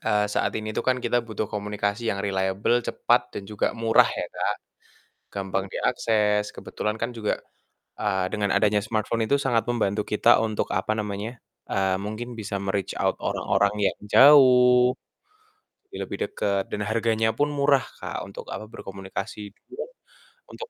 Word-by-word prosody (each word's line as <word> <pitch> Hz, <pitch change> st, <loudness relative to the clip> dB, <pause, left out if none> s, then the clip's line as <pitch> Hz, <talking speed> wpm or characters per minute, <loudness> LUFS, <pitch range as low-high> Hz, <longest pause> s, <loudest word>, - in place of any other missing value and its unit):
eee, 105 Hz, -1 st, +3 dB
saat 105 Hz, -, 0 dB
ini 110 Hz, 0 st, -4 dB
tuh -, -, -1 dB
kan 130 Hz, -, +3 dB
kita 120 Hz, -, +2 dB
butuh 110 Hz, -2 st, -4 dB
komunikasi 105 Hz, +2 st, -2 dB
yang 100 Hz, 0 st, -1 dB
reliable, 95 Hz, +4 st, +1 dB
cepat, -, -, 0 dB
dan -, -, -4 dB
juga 105 Hz, +2 st, -2 dB
murah 115 Hz, 0 st, +4 dB
ya, -, -, -3 dB
Kak. -, -, -1 dB, 0.8 s
Gampang 95 Hz, 0 st, -2 dB
diakses. 105 Hz, -2 st, +1 dB
Kebetulan 105 Hz, -, -3 dB
kan 120 Hz, -, 0 dB
juga, 105 Hz, -2 st, -1 dB, 0.6 s
eee, 95 Hz, -3 st, +1 dB
dengan 105 Hz, -2 st, 0 dB
adanya 105 Hz, +1 st, +3 dB
smartphone 110 Hz, +2 st, -1 dB
itu 140 Hz, -, +4 dB
sangat 120 Hz, -5 st, +1 dB
membantu 105 Hz, -3 st, 0 dB
kita 110 Hz, +2 st, +4 dB
untuk 110 Hz, -1 st, -1 dB
apa 95 Hz, +3 st, -1 dB
namanya, 105 Hz, +3 st, -4 dB, 0.3 s
eee, 95 Hz, -1 st, +1 dB
mungkin 115 Hz, +4 st, -5 dB
bisa 100 Hz, -3 st, -4 dB
me-reach 100 Hz, -1 st, -2 dB
out -, -, +1 dB
orang-orang 100 Hz, +1 st, +1 dB, 0.2 s
yang -, -, -43 dB
jauh, 125 Hz, -3 st, +7 dB, 1.0 s
jadi 400 Hz, -, -11 dB
lebih -, -, -4 dB
dekat, 100 Hz, -1 st, -1 dB
dan 105 Hz, -, -2 dB
harganya 110 Hz, +1 st, +1 dB
pun 145 Hz, +5 st, 0 dB
murah, 140 Hz, -1 st, +3 dB, 0.2 s
Kak, -, -, -5 dB
untuk -, -, -9 dB
apa, 110 Hz, +2 st, -6 dB
berkomunikasi, 100 Hz, 0 st, -7 dB
gitu -, -, -41 dB
kan, -, -, -5 dB, 0.6 s
untuk 465 Hz, -, -8 dB
105 Hz, 155 wpm, -25 LUFS, 100-120 Hz, 1.0 s, jauh